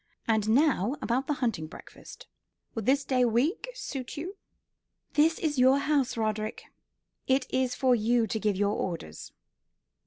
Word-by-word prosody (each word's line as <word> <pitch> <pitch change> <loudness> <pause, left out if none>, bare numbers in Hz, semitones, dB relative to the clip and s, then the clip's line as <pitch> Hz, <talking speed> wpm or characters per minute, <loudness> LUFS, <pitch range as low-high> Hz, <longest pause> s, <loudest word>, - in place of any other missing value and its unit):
And 220 -2 +1
now 260 - +3
about 255 +3 -1
the 295 - +1
hunting 180 -9 -2
breakfast. - - -12 0.5
Would 225 -3 -5
this 275 +1 +3
day 255 -2 +2
week 270 - +1
suit 275 - -6
you?" 360 +7 -5 0.8
"This 320 +2 +3
is 295 -5 -1
your 260 +2 +6
house, 280 -4 0
Roderick. 215 -1 -2 0.6
It 260 0 +2
is 260 -1 0
for 260 -2 +3
you 235 +1 +2
to 220 +1 -3
give 210 -2 0
your 205 +1 +1
orders." 165 - -5
250 Hz, 150 wpm, -28 LUFS, 220-280 Hz, 0.8 s, your